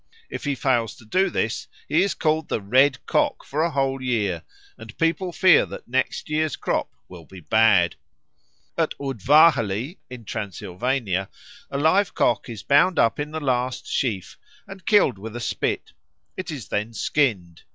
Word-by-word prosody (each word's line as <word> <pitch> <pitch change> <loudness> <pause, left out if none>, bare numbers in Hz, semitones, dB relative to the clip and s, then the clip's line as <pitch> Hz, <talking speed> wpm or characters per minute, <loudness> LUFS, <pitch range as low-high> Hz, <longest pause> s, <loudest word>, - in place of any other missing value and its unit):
If - - -6
he 145 -1 0
fails 120 -4 0
to 110 - -17
do 190 - +1
this, 115 -8 -2 0.2
he 160 - +3
is 200 0 0
called 155 -1 0
the - - 0
Red 130 +6 +2
Cock - - 0
for 150 +3 -2
a 170 - +2
whole 135 -3 -1
year, 105 -9 -1 0.3
and 110 +1 -12
people 170 +3 0
fear 185 0 +5
that - - -9
next 130 +2 -1
year's 155 -1 0
crop - - -2 0.2
will 90 -2 -12
be 95 - -12
bad. 100 -1 +3 0.8
Near - - +3
Udvarhely, 135 - +3
in 125 -3 -10
Transylvania, 100 +1 -3 0.4
a 140 - -3
live 160 +7 +2
cock 120 - +1
is 110 -4 -7
bound 150 +6 +4
up 115 - +2
in 145 0 -3
the 160 +1 -4
last 130 -3 -1
sheaf 105 -9 -2 0.3
and 190 -2 -12
killed 200 - +4
with 110 +2 -8
a - - -4
spit. 115 - -2 0.4
It 185 - -6
is 145 -8 -7
then 105 +3 -2
skinned. 95 - 0
130 Hz, 165 wpm, -23 LUFS, 110-155 Hz, 0.8 s, fear